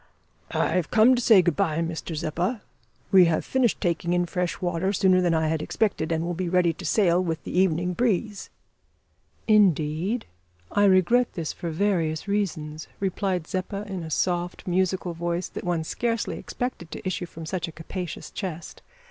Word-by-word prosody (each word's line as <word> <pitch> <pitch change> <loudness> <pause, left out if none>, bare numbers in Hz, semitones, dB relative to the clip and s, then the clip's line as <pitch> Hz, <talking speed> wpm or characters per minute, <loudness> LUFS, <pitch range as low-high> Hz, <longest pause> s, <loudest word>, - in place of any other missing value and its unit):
"I - - 0
have 180 -4 0
come 225 +3 +6
to 245 - +1
say 215 -6 +6
good 175 -3 +1
bye, 155 +1 0
Mr 165 0 -3
Zeppa. 175 +8 -2 0.5
We 190 -3 +8
have 165 -2 0
finished 255 -4 +1
taking 170 -1 0
in 175 0 +2
fresh 180 0 -2
water 180 0 0
sooner 185 -1 +4
than 175 -2 +2
I 160 0 +1
had 160 0 0
expected, 175 -4 -1
and 165 0 0
will 175 - -2
be 175 +1 -2
ready 175 -2 +3
to 175 +3 -9
sail 180 0 +3
with 165 -3 -3
the - - -6
evening 180 -1 +2
breeze." 210 -1 -1 1.0
"Indeed? 190 - +2 0.5
I 205 0 +3
regret 200 +6 +4
this 165 -5 -3
for 170 - -5
various 165 -2 0
reasons" 155 -7 -2
replied 190 -3 -1
Zeppa, 190 +3 -3
in 190 -3 -5
a 160 - -6
soft 175 +2 -1
musical 185 0 0
voice, 170 +1 -2
that - - -7
one 175 -2 -1
scarcely 230 +6 -2
expected 245 -9 -5
to 175 - -6
issue 180 -1 -2
from 165 -1 -9
such 175 +1 -3
a - - -7
capacious 165 +1 -6
chest. 175 -5 -6
180 Hz, 175 wpm, -25 LUFS, 165-195 Hz, 1.0 s, We